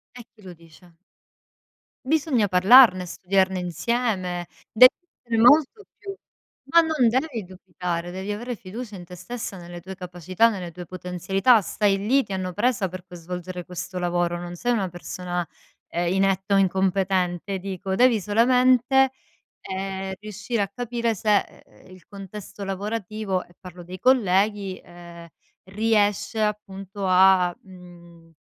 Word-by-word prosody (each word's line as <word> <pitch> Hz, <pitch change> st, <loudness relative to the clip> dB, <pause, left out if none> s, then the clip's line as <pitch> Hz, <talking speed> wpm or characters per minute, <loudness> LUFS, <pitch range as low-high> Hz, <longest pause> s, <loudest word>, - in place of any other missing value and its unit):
E 245 Hz, -, -10 dB
chi 225 Hz, -, -22 dB
lo 185 Hz, -3 st, -10 dB
dice? 165 Hz, +1 st, -20 dB, 1.1 s
Bisogna 275 Hz, -6 st, +1 dB
parlarne, 185 Hz, +1 st, +6 dB
studiarne 190 Hz, +1 st, 0 dB
insieme, 180 Hz, -1 st, -2 dB, 0.2 s
devi 250 Hz, +3 st, +9 dB, 0.3 s
essere 235 Hz, -1 st, -3 dB
molto 295 Hz, -, +5 dB
più 395 Hz, -1 st, -7 dB, 0.6 s
ma 335 Hz, -, +6 dB
non 315 Hz, -7 st, +2 dB
devi 245 Hz, -2 st, -1 dB
dubitare, 180 Hz, -1 st, -5 dB
devi 190 Hz, +2 st, -6 dB
avere 240 Hz, +4 st, -5 dB
fiducia 210 Hz, +2 st, -8 dB
in 175 Hz, -, -10 dB
te 180 Hz, +1 st, -11 dB
stessa, 215 Hz, +3 st, -7 dB
nelle 175 Hz, 0 st, -9 dB
tue 190 Hz, +2 st, -9 dB
capacità, 180 Hz, +4 st, 0 dB
nelle 185 Hz, -6 st, -5 dB
tue 175 Hz, +1 st, -9 dB
potenzialità. 185 Hz, +6 st, +1 dB
Stai 200 Hz, +2 st, 0 dB
lì, 245 Hz, +8 st, +2 dB
ti 200 Hz, -, -7 dB
hanno 185 Hz, -1 st, -3 dB
presa 210 Hz, -1 st, 0 dB
per 185 Hz, 0 st, -9 dB
poi 180 Hz, -1 st, -12 dB
svolgere 180 Hz, +1 st, -7 dB
questo 180 Hz, +1 st, -6 dB
lavoro, 175 Hz, -1 st, -1 dB
non 175 Hz, 0 st, -7 dB
sei 245 Hz, +6 st, 0 dB
una 195 Hz, -5 st, -1 dB
persona, 175 Hz, 0 st, -5 dB, 0.4 s
ehm, 175 Hz, 0 st, -2 dB
inetta 195 Hz, +1 st, +1 dB
o -, -, +5 dB
incompetente 190 Hz, -1 st, 0 dB
dico, 190 Hz, 0 st, -4 dB
devi 240 Hz, 0 st, +4 dB
solamente, 250 Hz, +5 st, +3 dB, 0.5 s
ehm, 190 Hz, 0 st, -5 dB
riuscire 210 Hz, +2 st, -4 dB
a 200 Hz, -, 0 dB
capire 235 Hz, +1 st, -2 dB
se 210 Hz, +1 st, +2 dB
e -, -, -6 dB, 0.2 s
e, -, -, -17 dB
il 185 Hz, -, -17 dB
contesto 200 Hz, +1 st, -9 dB
lavorativo, 200 Hz, 0 st, -3 dB
e 175 Hz, -, -23 dB
parlo 180 Hz, -1 st, -11 dB
dei 185 Hz, +2 st, -9 dB
colleghi, 200 Hz, -5 st, +2 dB
ehm, 170 Hz, -1 st, -13 dB, 0.4 s
riesce 210 Hz, 0 st, 0 dB
appunto 200 Hz, -2 st, -4 dB
a, 185 Hz, -1 st, +5 dB
mhmm, 175 Hz, -3 st, -16 dB
190 Hz, 145 wpm, -24 LUFS, 180-220 Hz, 1.1 s, devi